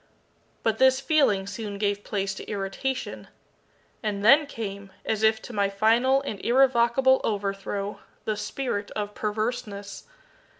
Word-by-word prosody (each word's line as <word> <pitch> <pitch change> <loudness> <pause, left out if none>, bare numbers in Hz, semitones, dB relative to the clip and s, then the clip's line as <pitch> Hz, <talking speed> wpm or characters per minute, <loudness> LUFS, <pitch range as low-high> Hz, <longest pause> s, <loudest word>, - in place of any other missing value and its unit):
But 225 -1 +1
this 260 0 +5
feeling 275 - +2
soon 200 0 -5
gave 205 0 -1
place 195 -2 -2
to - - -8
irritation. 205 +6 -3 0.7
And 205 -2 -2
then 285 +5 +7
came, 200 -6 -6
as 220 -1 -1
if 220 0 +4
to 245 - -9
my 200 -2 +1
final 235 +7 +3
and 210 -8 -5
irrevocable 260 +1 +4
overthrow, 200 -1 -2 0.3
the 215 - 0
spirit 210 -1 -3
of 210 -1 -3
PERVERSENESS. 210 -2 -3
215 Hz, 130 wpm, -26 LUFS, 200-245 Hz, 0.7 s, then